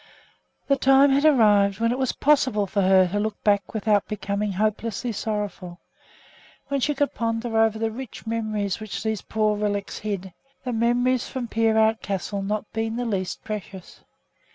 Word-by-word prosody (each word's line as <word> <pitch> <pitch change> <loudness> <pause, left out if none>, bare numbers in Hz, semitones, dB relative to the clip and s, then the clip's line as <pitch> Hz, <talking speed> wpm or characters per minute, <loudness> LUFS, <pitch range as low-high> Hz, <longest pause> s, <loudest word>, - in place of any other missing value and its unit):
The 275 - +2
time 270 +1 +5
had 280 +2 +3
arrived 210 -8 +4
when 230 0 +2
it 250 - -2
was 260 -2 +1
possible 260 -8 +2
for 200 +1 -1
her 190 -1 +5
to 205 +3 -1
look 215 0 -2
back 205 -2 +2
without 210 -1 +1
becoming 205 -1 -2
hopelessly 215 +4 -1
sorrowful; 205 -5 -4 0.9
when 280 0 0
she 295 +3 0
could 285 +1 0
ponder 230 0 -2
over 220 -1 +3
the 225 0 -1
rich 250 +1 -8
memories 215 -3 -2
which 215 -2 -6
these 220 -3 -2
poor 215 -1 0
relics 205 -1 -2
hid, 195 -4 -4 0.3
the 250 -2 -3
memories 240 +2 +1
from 255 -3 -4
Peerout 220 0 +2
Castle 200 +1 -3
not 210 +2 -2
being 225 0 -2
the 245 +1 -2
least 195 -5 -3
precious. 200 -3 -7
220 Hz, 165 wpm, -24 LUFS, 205-235 Hz, 0.9 s, time